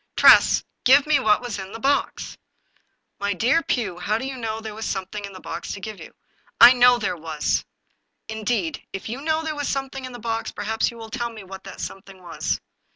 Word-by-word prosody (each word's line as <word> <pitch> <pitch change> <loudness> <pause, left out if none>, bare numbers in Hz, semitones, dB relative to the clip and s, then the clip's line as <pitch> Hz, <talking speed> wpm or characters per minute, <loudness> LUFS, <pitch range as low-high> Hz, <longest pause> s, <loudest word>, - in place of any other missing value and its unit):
" - - -53
Tress, - - +7 0.2
give 275 +3 +6
me 300 -2 +3
what 215 -3 +3
was 235 -5 -4
in 190 0 -7
the 225 - -7
box." 275 +3 0 0.4
" - - -48
My 200 0 0
dear 250 - +3
Pugh, 205 - -2
how 210 +4 0
do 260 - -5
you 270 0 -4
know 225 -3 -3
that 220 - -8
there 220 -1 -6
was 220 +1 -5
some 190 -1 -2
thing 205 +2 -6
in 200 - -10
the 185 - -10
box - - -6
to 200 - -6
give 215 +1 -7
you? - - -12
" - - -39
" - - -34
I - - +5
know 245 0 +6
there 180 - -2
was! 160 -2 -1 0.2
" - - -47
" - - -53
Indeed! 220 -6 -2
If 195 - -6
you 245 +5 -5
know 315 +1 0
that - - -8
there 310 -1 -2
was 290 -1 -3
something 270 -1 -3
in 255 - -6
the 245 - -8
box, 225 -1 -3
perhaps 220 +1 -1
you 235 - -11
will 225 -1 -9
tell 240 0 -2
me 220 -3 -10
what 190 0 -10
that - - -9
something 195 0 -8
was." 175 -2 -3
225 Hz, 260 wpm, -23 LUFS, 200-255 Hz, 0.4 s, Tress